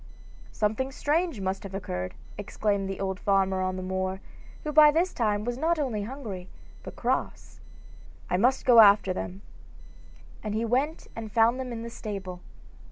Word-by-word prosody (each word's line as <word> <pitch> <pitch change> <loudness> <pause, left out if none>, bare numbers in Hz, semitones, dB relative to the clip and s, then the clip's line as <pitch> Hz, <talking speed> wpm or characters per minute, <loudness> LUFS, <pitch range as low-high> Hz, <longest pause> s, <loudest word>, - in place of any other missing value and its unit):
'Something 220 +5 -1
strange 310 - 0
must 190 +2 -2
have 195 -3 -8
occurred,' 90 - -4 0.2
exclaimed 200 -1 -1
the 195 - -5
old 190 -1 -2
farmer 195 -1 +2
on 185 0 -1
the 185 - -5
moor, 190 0 -2 0.4
who 300 - -3
by 300 0 +8
this 335 +5 +1
time 210 -3 0
was 245 +1 -3
not 330 +3 +2
only 255 -8 -1
hungry, 205 -6 -7 0.3
but - - -9
cross. - - -2 0.7
'I 180 - +1
must 250 +7 +2
go 245 -3 +7
after 200 -3 +7
them.' 185 +2 -6 1.0
And 210 -1 -3
he 225 +1 0
went 270 +7 0
and 220 -2 -6
found 230 +3 +3
them 255 -1 -4
in 230 -1 -5
the 235 - -6
stable. 195 -5 -6
210 Hz, 165 wpm, -27 LUFS, 190-255 Hz, 1.0 s, by